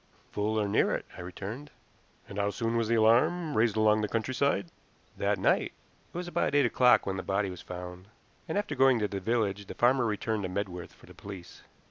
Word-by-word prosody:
"Full, 110 Hz, +1 st, 0 dB
or 105 Hz, -, 0 dB
near 100 Hz, -, +2 dB
it," -, -, -5 dB
I -, -, -8 dB
returned. 100 Hz, +10 st, -7 dB, 0.6 s
"And 100 Hz, -, -6 dB
how 100 Hz, 0 st, +1 dB
soon 115 Hz, +3 st, -2 dB
was 115 Hz, -1 st, +1 dB
the 115 Hz, -, +2 dB
alarm 145 Hz, +9 st, +3 dB
raised 110 Hz, -1 st, +2 dB
along 110 Hz, 0 st, +4 dB
the 105 Hz, -, 0 dB
countryside?" 115 Hz, -3 st, 0 dB, 0.4 s
"That -, -, 0 dB
night. -, -, +1 dB, 0.4 s
It -, -, -7 dB
was 180 Hz, 0 st, -4 dB
about 175 Hz, -, 0 dB
eight 145 Hz, -2 st, +5 dB
o'clock 125 Hz, +1 st, +4 dB
when 95 Hz, -1 st, -2 dB
the -, -, -2 dB
body 100 Hz, 0 st, -1 dB
was 90 Hz, -, -9 dB
found, 90 Hz, +1 st, -8 dB, 0.4 s
and 160 Hz, -, -1 dB
after 205 Hz, -7 st, -1 dB
going 135 Hz, -2 st, +4 dB
to 105 Hz, -2 st, 0 dB
the 100 Hz, -1 st, -4 dB
village 100 Hz, -1 st, -1 dB
the -, -, -8 dB
farmer 120 Hz, 0 st, +3 dB
returned 110 Hz, 0 st, -1 dB
to 95 Hz, -, -3 dB
Medworth 90 Hz, -2 st, -4 dB
for -, -, -18 dB
the -, -, -14 dB
police." 95 Hz, -3 st, -10 dB
110 Hz, 210 wpm, -29 LUFS, 100-125 Hz, 0.6 s, eight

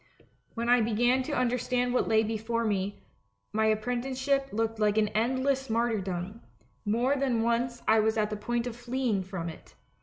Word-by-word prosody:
When 235 Hz, 0 st, -2 dB
I 245 Hz, 0 st, +5 dB
began 240 Hz, +4 st, +2 dB
to 260 Hz, -, -5 dB
understand 250 Hz, 0 st, 0 dB
what 250 Hz, -, +1 dB
lay 220 Hz, 0 st, +4 dB
before 225 Hz, +1 st, -2 dB
me, 205 Hz, -1 st, -2 dB, 0.5 s
my 220 Hz, +1 st, +2 dB
apprenticeship 255 Hz, +5 st, 0 dB
looked 225 Hz, +1 st, -1 dB
an 210 Hz, 0 st, +2 dB
endless 260 Hz, +4 st, 0 dB
martyrdom; 215 Hz, -3 st, -1 dB, 0.4 s
more 240 Hz, +6 st, +2 dB
than 260 Hz, -5 st, +1 dB
once 240 Hz, +1 st, 0 dB
I 220 Hz, 0 st, +5 dB
was 220 Hz, +1 st, +2 dB
at 215 Hz, 0 st, +1 dB
the -, -, -1 dB
point 235 Hz, +3 st, -2 dB
of 245 Hz, -2 st, -4 dB
fleeing 240 Hz, -4 st, -1 dB
from 185 Hz, -2 st, -5 dB
it. 165 Hz, -, -10 dB
230 Hz, 160 wpm, -29 LUFS, 215-245 Hz, 0.5 s, I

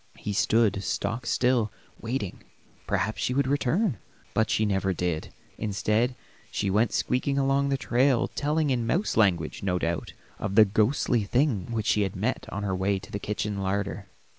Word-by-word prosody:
He 105 Hz, -, -4 dB
stood 100 Hz, -1 st, +2 dB
stock 115 Hz, +6 st, -2 dB
still 125 Hz, -4 st, +2 dB, 0.3 s
waiting; 115 Hz, -5 st, -4 dB, 0.5 s
perhaps 110 Hz, -, -1 dB
she 125 Hz, -, 0 dB
would 140 Hz, 0 st, +2 dB
return; 145 Hz, -, +1 dB, 0.3 s
but 110 Hz, -1 st, +2 dB
she 110 Hz, -, +2 dB
never 95 Hz, -2 st, +1 dB
did. 85 Hz, -2 st, -2 dB, 0.3 s
Instead, 110 Hz, +4 st, 0 dB, 0.3 s
she 100 Hz, -, -1 dB
went 110 Hz, +3 st, +2 dB
squeaking 140 Hz, +2 st, 0 dB
along 140 Hz, 0 st, +2 dB
the 135 Hz, -, +1 dB
trail 130 Hz, -1 st, +2 dB
telling, 150 Hz, 0 st, 0 dB
in 120 Hz, -3 st, 0 dB
mouse 180 Hz, -, 0 dB
language, 90 Hz, -8 st, +2 dB
no 90 Hz, -2 st, 0 dB
doubt, 85 Hz, -1 st, -2 dB, 0.3 s
of 100 Hz, -1 st, -3 dB
the 110 Hz, -1 st, +8 dB
ghostly 110 Hz, +3 st, +2 dB
thing 120 Hz, -, 0 dB
which 110 Hz, -2 st, -2 dB
she 105 Hz, -, +3 dB
had 95 Hz, -2 st, -1 dB
met -, -, -2 dB
on 105 Hz, -, -4 dB
her 95 Hz, -2 st, -1 dB
way 95 Hz, +2 st, +1 dB
to 95 Hz, -, -10 dB
the 100 Hz, -, -3 dB
kitchen 105 Hz, 0 st, -3 dB
larder. 100 Hz, +1 st, -2 dB
110 Hz, 170 wpm, -27 LUFS, 100-125 Hz, 0.5 s, the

